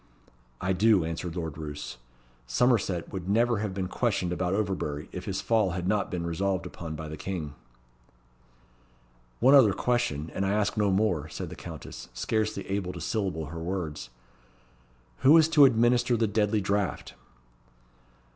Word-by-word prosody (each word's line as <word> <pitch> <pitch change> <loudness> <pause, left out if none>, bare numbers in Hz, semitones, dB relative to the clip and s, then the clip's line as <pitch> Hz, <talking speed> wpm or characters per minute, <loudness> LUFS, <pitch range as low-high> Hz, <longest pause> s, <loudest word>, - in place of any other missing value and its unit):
"I 95 +1 0
do," 100 -2 +4
answered 85 +1 -4
Lord 80 -3 -4
Roos. 75 -4 -6 0.5
"Somerset 95 - +1
would 95 -1 -5
never 115 +1 +2
have 105 -1 -2
been 95 -1 -3
questioned 95 -5 -1
about 90 +1 -1
Overbury, 90 -8 -2
if 90 - -7
his 95 -1 -2
fall 105 -3 +2
had 90 0 -3
not 105 +1 +1
been 85 -2 -3
resolved 95 +2 -1
upon 80 -2 -7
by 80 0 -6
the 75 - -6
King." 80 -4 -4 1.9
"One 130 +4 +6
other 125 -8 +7
question, 95 -13 -1
and 95 - -1
I 95 +1 +1
ask 105 -1 0
no 105 -2 +2
more," 95 -6 +1
said - - -6
the - - -7
Countess, 65 0 -9
scarcely 110 - -1
able 95 -2 -2
to 85 - -7
syllable 90 -2 -2
her 85 - -5
words. 80 -7 -4 1.1
"Who 145 +5 +7
is 160 -1 +6
to 150 -3 +7
administer 120 0 +3
the 115 - +2
deadly 105 0 +1
draught?" 100 -4 -1
95 Hz, 155 wpm, -28 LUFS, 85-110 Hz, 1.9 s, other